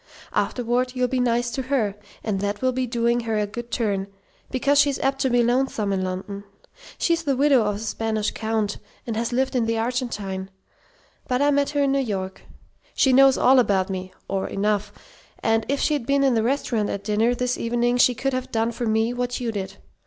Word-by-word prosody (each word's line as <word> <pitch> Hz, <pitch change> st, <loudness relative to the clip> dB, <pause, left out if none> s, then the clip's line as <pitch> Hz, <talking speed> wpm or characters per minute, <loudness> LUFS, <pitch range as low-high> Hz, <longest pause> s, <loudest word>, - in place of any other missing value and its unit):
Afterward 250 Hz, +1 st, 0 dB
you'll 250 Hz, 0 st, +1 dB
be 255 Hz, +1 st, -1 dB
nice 240 Hz, 0 st, +1 dB
to 265 Hz, -, -2 dB
her, 250 Hz, -6 st, 0 dB, 0.3 s
and 205 Hz, -3 st, -1 dB
that 205 Hz, +3 st, -3 dB
will 255 Hz, -, +3 dB
be 255 Hz, 0 st, -2 dB
doing 235 Hz, 0 st, +1 dB
her 225 Hz, -2 st, -2 dB
a 210 Hz, -, +1 dB
good 240 Hz, +3 st, -7 dB
turn, 200 Hz, -5 st, -1 dB, 0.4 s
because 280 Hz, +2 st, +2 dB
she's 285 Hz, -2 st, +3 dB
apt 270 Hz, 0 st, 0 dB
to 265 Hz, -, +2 dB
be 245 Hz, -1 st, +3 dB
lonesome 240 Hz, -4 st, +1 dB
in 190 Hz, -1 st, -1 dB
London. 190 Hz, +2 st, -5 dB, 0.5 s
She's 335 Hz, -1 st, +1 dB
the 280 Hz, -5 st, 0 dB
widow 275 Hz, -2 st, +5 dB
of 210 Hz, -1 st, 0 dB
a -, -, -4 dB
Spanish 220 Hz, 0 st, -2 dB
Count, 220 Hz, -2 st, -2 dB, 0.3 s
and 230 Hz, -, -3 dB
has 230 Hz, +2 st, -1 dB
lived 260 Hz, +2 st, 0 dB
in 235 Hz, -3 st, +1 dB
the 230 Hz, 0 st, 0 dB
Argentine, 225 Hz, -6 st, -3 dB, 0.8 s
but 250 Hz, 0 st, 0 dB
I 290 Hz, +1 st, +3 dB
met 285 Hz, 0 st, +2 dB
her 285 Hz, -, +3 dB
in 275 Hz, -, +2 dB
New 275 Hz, -, +2 dB
York. 195 Hz, -7 st, -3 dB, 0.5 s
She 265 Hz, -, +4 dB
knows 270 Hz, 0 st, +6 dB
all 260 Hz, +1 st, +5 dB
about 195 Hz, -5 st, +2 dB
me 185 Hz, 0 st, -5 dB, 0.2 s
or 195 Hz, -1 st, -2 dB
enough 205 Hz, 0 st, -1 dB, 0.5 s
and 225 Hz, 0 st, +1 dB
if 280 Hz, 0 st, +1 dB
she'd 290 Hz, -6 st, 0 dB
been 275 Hz, 0 st, +3 dB
in 270 Hz, -2 st, +4 dB
the 225 Hz, -, +2 dB
restaurant 235 Hz, -3 st, 0 dB
at 200 Hz, -, -4 dB
dinner 220 Hz, +4 st, +1 dB
this 250 Hz, 0 st, -1 dB
evening 240 Hz, +1 st, 0 dB
she 250 Hz, 0 st, +4 dB
could 270 Hz, +3 st, -1 dB
have 255 Hz, 0 st, -3 dB
done 225 Hz, +1 st, 0 dB
for 235 Hz, 0 st, -3 dB
me 220 Hz, +2 st, +1 dB
what 245 Hz, 0 st, -2 dB
you 240 Hz, -2 st, -2 dB
did. 195 Hz, -2 st, -5 dB
235 Hz, 210 wpm, -23 LUFS, 210-255 Hz, 0.8 s, knows